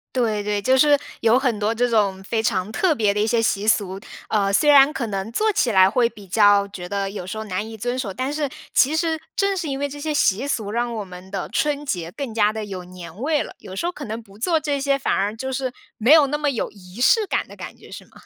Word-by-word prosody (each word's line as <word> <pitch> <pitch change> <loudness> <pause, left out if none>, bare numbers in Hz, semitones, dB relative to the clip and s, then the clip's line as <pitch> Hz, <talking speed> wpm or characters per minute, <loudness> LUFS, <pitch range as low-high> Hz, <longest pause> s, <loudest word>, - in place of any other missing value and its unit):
对， 220 -4 +1
对， 205 0 -1
就 260 +6 +3
是 290 +1 +5 0.2
有 230 +2 +4
很 250 -6 0
多 215 +2 0
这 245 +2 +1
种 200 -4 +1
非 220 +3 -1
常 205 -2 -1
特 330 +7 +1
别 210 -5 +2
的 210 - -2
一 215 - +1
些 230 0 +2
习 210 -2 0
俗， 195 -4 +1 0.3
呃， 200 -2 +1
虽 295 - +4
然 285 0 +7
可 240 -6 -3
能 195 0 -3
做 430 - +1
起 255 - +1
来 190 -1 +6
会 235 +3 +2
比 215 -4 -12
较 205 +1 +4
觉 180 -3 -8
得 200 0 -2
有 190 -3 -7
时 215 - -5
候 220 - -4
难 205 +1 -4
以 225 - -8
遵 245 +4 -3
守， 210 -7 -3
但 260 +6 -3
是 300 -1 -1 0.3
其 280 +4 +4
实 320 -1 0 0.2
正 395 -1 +1
是 340 -3 -3
因 275 -2 -2
为 285 +1 -2
这 290 +1 -8
些 305 +1 -2
习 265 -3 +2
俗， 215 -7 -2
让 235 +1 -1
我 215 - -3
们 185 0 -12
的 195 0 -4
春 295 -1 -1
节 175 - -3
更 270 -3 -5
加 210 -1 +2
地 220 0 -4
有 190 -3 -7
年 180 0 -11
味 300 +2 +1
了。 - - -10
有 190 - -10
时 265 - -3
候 350 - 0
可 300 -5 -8
能 225 +1 -6
不 200 -1 -18
做 330 +7 +2
这 295 -2 -1
些 275 0 +1
反 275 - -1
而 205 +2 0
就 265 +4 -4
是 260 -1 -3 0.2
没 235 +7 +5
有 310 -3 +7
那 295 +2 -1
么 295 -1 0
有 250 -5 -3
仪 190 +2 -11
式 420 - +4
感 - - -1
的 - - -14
感 - - -8
觉 - - -16
是 - - -9
吗？ - - -27
225 Hz, 295 characters per minute, -22 LUFS, 200-280 Hz, 0.3 s, 然